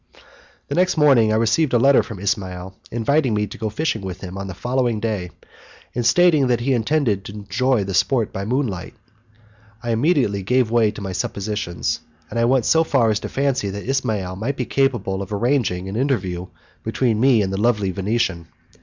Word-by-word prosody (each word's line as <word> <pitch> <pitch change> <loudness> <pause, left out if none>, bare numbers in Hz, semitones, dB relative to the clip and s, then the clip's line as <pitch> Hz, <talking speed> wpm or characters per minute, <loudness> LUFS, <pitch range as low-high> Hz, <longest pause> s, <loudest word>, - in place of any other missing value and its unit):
The - - -4
next 180 +2 +2
morning 135 -8 +5
I - - +2
received 115 +7 +2
a - - +6
letter 135 +3 +5
from 110 - -8
Ismail 95 -2 -3 0.2
inviting 125 +1 +1
me 105 0 +1
to - - -10
go 110 -2 -2
fishing 115 -1 -2
with 95 -2 -6
him 95 -1 -7
on 95 0 -5
the 95 - -7
following 120 0 0
day, 105 -5 -2 0.6
and 120 - -1
stating 155 +2 +4
that 120 -2 +1
he 135 +2 +1
intended 115 -4 +1
to 100 - -8
enjoy 110 +3 0
the 95 0 -4
sport 115 +5 +1
by 95 - -3
moonlight. 110 -6 -2 0.9
I 120 - -1
immediately 115 - +1
gave 125 +3 +1
way 115 -2 +4
to 105 0 -8
my 95 -1 -4
suppositions, 90 -4 -3 0.3
and 115 - -2
I 115 - +3
went 125 -1 +2
so 160 0 +4
far 130 -8 +2
as 105 - 0
to - - -6
fancy 135 -7 0
that 100 +3 -6
Ismail 110 -9 -1
might 125 +7 -3
be 125 - -2
capable 115 -9 0
of 100 +1 -7
arranging 105 -5 0
an 95 - -5
interview 95 -9 -1 0.3
between 115 -5 0
me 120 -3 +4
and 95 0 -3
the 95 - -2
lovely 105 -5 +1
Venetian. 95 -3 -1
110 Hz, 195 wpm, -21 LUFS, 100-130 Hz, 0.9 s, a